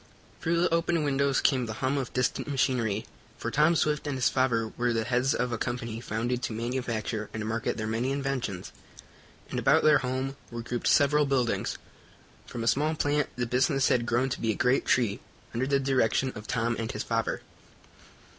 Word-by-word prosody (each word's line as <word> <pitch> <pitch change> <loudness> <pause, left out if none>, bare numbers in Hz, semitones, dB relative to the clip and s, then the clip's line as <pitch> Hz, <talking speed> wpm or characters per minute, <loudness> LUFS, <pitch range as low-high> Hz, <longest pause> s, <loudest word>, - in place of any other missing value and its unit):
Through 170 -1 +1
the 175 -1 +2
open 170 -1 +1
windows 140 -1 +1
came 130 -4 +2
the 110 - -4
hum 130 +4 0
of 130 - -4
distant 125 -1 -1
machinery, 125 -6 0 0.3
for - - -4
Tom 155 +3 +4
Swift 150 -1 0
and 145 - -1
his 125 - +3
father 115 -4 +1
were 120 +1 -1
the 115 -1 0
heads 125 +3 +1
of 125 0 -1
a 115 - -2
company 115 -2 -3
founded 120 +2 -2
to 115 - -3
manufacture 115 -2 -3
and 110 -1 -3
market 115 0 -1
their 110 - -2
many 115 +4 -1
inventions, 135 -9 -3 0.8
and - - -1
about - - +4
their 155 -1 +6
home 130 +2 -3
were 120 -1 -6
grouped 120 0 -3
several 145 0 +4
buildings. 130 -4 0 0.7
From 120 - -5
a - - -2
small 155 +5 +2
plant 145 -1 +1
the 120 0 -1
business 135 +3 +2
had 120 -1 +2
grown 120 +3 +1
to 125 - -4
be 115 - 0
a 110 - +1
great 125 +6 +2
tree, 115 -6 +2 0.3
under 125 +3 -1
the 140 0 +2
direction 130 -1 +1
of 105 -1 -9
Tom 115 0 0
and 115 -1 -2
his 105 - -4
father. 115 -1 -1
125 Hz, 195 wpm, -28 LUFS, 115-135 Hz, 0.8 s, their